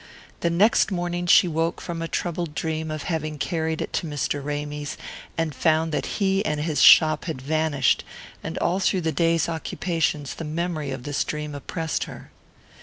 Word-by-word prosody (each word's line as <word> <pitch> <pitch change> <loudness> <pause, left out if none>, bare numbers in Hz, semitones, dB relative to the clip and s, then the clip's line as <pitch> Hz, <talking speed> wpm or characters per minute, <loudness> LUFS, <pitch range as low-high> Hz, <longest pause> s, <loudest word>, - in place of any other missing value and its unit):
The 170 - +1
next 195 +8 +4
morning 175 -2 -2
she 180 - +7
woke 165 0 -1
from 170 -1 -5
a 165 - -2
troubled 170 -2 -3
dream 160 -1 -2
of 155 -1 -4
having 155 -3 -2
carried 160 0 -1
it - - -8
to 170 - -1
Mr. 145 -1 -2
Ramy's, 145 0 -4 0.4
and 165 -2 0
found 160 +2 +2
that - - -1
he 195 -1 +2
and 150 -6 -1
his 150 -3 0
shop 155 -1 +7
had 160 -7 -4
vanished; 145 -1 +1 0.4
and - - -4
all 180 +3 +1
through 190 -1 +1
the 160 -1 0
day's 165 0 +2
occupations 160 -4 -1
the - - -7
memory 160 -1 -2
of 130 -2 -5
this 145 0 -1
dream 150 -1 -4
oppressed 160 +3 -3
her. - - -11
160 Hz, 180 wpm, -24 LUFS, 150-170 Hz, 0.4 s, she